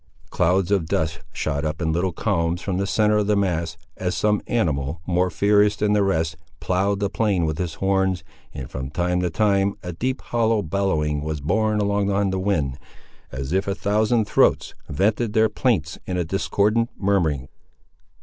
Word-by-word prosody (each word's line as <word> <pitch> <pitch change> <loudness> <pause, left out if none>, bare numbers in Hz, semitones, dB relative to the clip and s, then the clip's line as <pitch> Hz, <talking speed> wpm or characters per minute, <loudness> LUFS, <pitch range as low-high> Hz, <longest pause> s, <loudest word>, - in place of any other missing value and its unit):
Clouds 95 +2 +2
of 95 -6 +1
dust 80 0 -1
shot 70 -2 -2
up 75 +1 -2
in 80 -2 0
little 90 +3 0
columns 85 +1 -1
from 95 -3 -2
the 100 +1 -1
centre 105 +1 +2
of 105 -1 +1
the 105 - +3
mass, 85 -6 -1 0.2
as 90 -1 -2
some 105 -1 +2
animal, 80 - -1
more 90 0 +1
furious 105 +2 +3
than 105 0 +1
the 105 - +3
rest, 80 -5 0 0.2
ploughed 100 +2 0
the 100 - +1
plain 100 -4 0
with 80 0 -2
his 85 -3 -3
horns, 95 -1 0 0.3
and, 65 -3 -7
from 65 +1 -5
time 90 +3 0
to 90 0 0
time, 100 +3 +1
a 90 0 -5
deep 130 +10 -3
hollow 115 -3 +1
bellowing 80 -5 0
was 75 0 -3
borne 105 +8 +1
along 100 -1 +1
on 100 -1 +1
the 95 - -1
wind, 75 -9 -1 0.5
as 65 +3 -4
if 95 +1 +1
a 100 - 0
thousand 110 +3 +1
throats - - +2 0.2
vented 105 - 0
their 110 0 +4
plaints 100 - 0
in 90 - -2
a 90 - +1
discordant 105 +5 +1
murmuring. 80 -10 0
95 Hz, 180 wpm, -23 LUFS, 80-105 Hz, 0.5 s, their